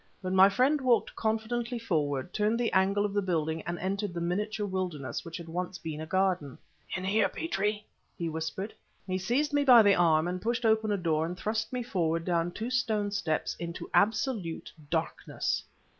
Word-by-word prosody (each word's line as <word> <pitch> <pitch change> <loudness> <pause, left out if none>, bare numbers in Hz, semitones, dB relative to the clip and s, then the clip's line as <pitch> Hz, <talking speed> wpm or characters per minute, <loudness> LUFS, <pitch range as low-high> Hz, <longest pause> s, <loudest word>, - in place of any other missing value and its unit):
But 185 -1 -3
my 190 +1 +7
friend 265 +7 +2
walked 250 -3 +2
confidently 230 +2 -1
forward, 155 - -1
turned 215 +2 +1
the 240 - 0
angle 195 +2 +3
of 205 - -3
the 205 - +2
building 160 -4 -1
and 170 0 -2
entered 195 0 -2
the - - -2
miniature 205 +5 -1
wilderness 185 -8 -3
which 165 +1 -7
once 175 +2 -4
had - - -25
been 155 -1 -4
a 160 - -6
garden. 185 -6 0 0.4
"In 185 - -5
here, 200 +4 +2
Petrie!" 210 -8 -2 0.3
he 170 - -2
whispered. 160 +6 -4 0.3
He 185 -1 -2
seized 275 +10 0
me 290 0 +3
by 245 -5 +8
the 200 -1 +6
arm, 175 0 +2
pushed 235 +3 -1
open 220 -1 +3
a 205 - +1
door 160 -3 0
and 180 +1 -5
thrust 220 +2 -2
me 250 -1 -2
forward 165 -7 -1
down 170 -1 +1
two 225 +7 -4
stone 220 -5 0
steps 160 -6 -1
into 170 0 -6
absolute 205 -5 0 0.2
darkness. - - -2
195 Hz, 185 wpm, -29 LUFS, 170-220 Hz, 0.4 s, by